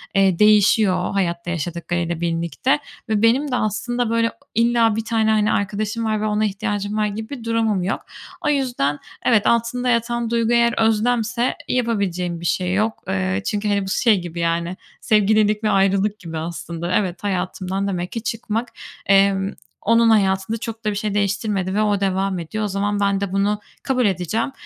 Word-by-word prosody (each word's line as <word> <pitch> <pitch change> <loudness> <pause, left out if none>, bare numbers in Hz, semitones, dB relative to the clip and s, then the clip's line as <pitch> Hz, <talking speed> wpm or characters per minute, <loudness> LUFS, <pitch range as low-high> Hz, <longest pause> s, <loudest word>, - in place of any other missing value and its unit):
eee, 195 -3 +3
değişiyor 210 -3 +4
hayatta 175 -3 -1
yaşadıklarıyla 170 0 -3
birlikte 165 -4 0 0.3
ve 215 -2 +1
benim 265 +5 +3
de - - +1
aslında 240 +2 -1
böyle 230 0 +1 0.2
illa 230 -1 +3
bir 225 - -2
tane, 220 -1 +1
hani, 215 0 +2
arkadaşım 210 +3 -1
var 215 -1 0
ve - - -1
ona 215 0 +1
ihtiyacım 205 0 -2
var 215 - +2
gibi 220 +5 -6
durumum 225 -4 0
yok. 190 - -2 0.4
O 295 - 0
yüzden 245 - 0 0.3
evet, 220 -4 +4
altında 235 +2 +1
yatan 235 0 0
duygu 230 0 +1
eğer 235 0 +4
özlemse 230 +2 +1
yapabileceğim 195 -8 -1
bir 170 - -2
şey 185 0 0
yok. 215 +3 -1
Eee, 190 +1 -1
çünkü, 210 0 -1
hani, 200 -1 +1
bu - - -5
şey 210 -1 +3
gibi 175 -1 -7
yani 170 +2 -1 0.2
sevgililik 215 0 +3
ve 215 - +2
ayrılık 195 +2 +2
gibi 165 -3 -7
aslında. 170 +1 -4
Evet, 185 -2 -1
hayatımdan 190 0 -2
demek 180 -2 -3
ki 230 -2 -5
çıkmak, 225 +1 -2 0.4
emm, 195 0 +3 0.3
onun 230 +1 +4
hayatında 195 0 +2
çok 225 0 -7
da 210 - +2
bir - - -4
şey 205 0 -2
değiştirmedi 200 -1 -1
ve 210 - +2
o 205 -2 +1
devam 195 -1 0
ediyor. 215 +6 -4
O - - 0
zaman 205 +1 -1
ben 200 -1 +1
de 200 -2 -2
bunu 205 +1 +1 0.2
kabul 255 -3 +1
edeceğim. 200 - -1
205 Hz, 175 wpm, -21 LUFS, 190-225 Hz, 0.4 s, değişiyor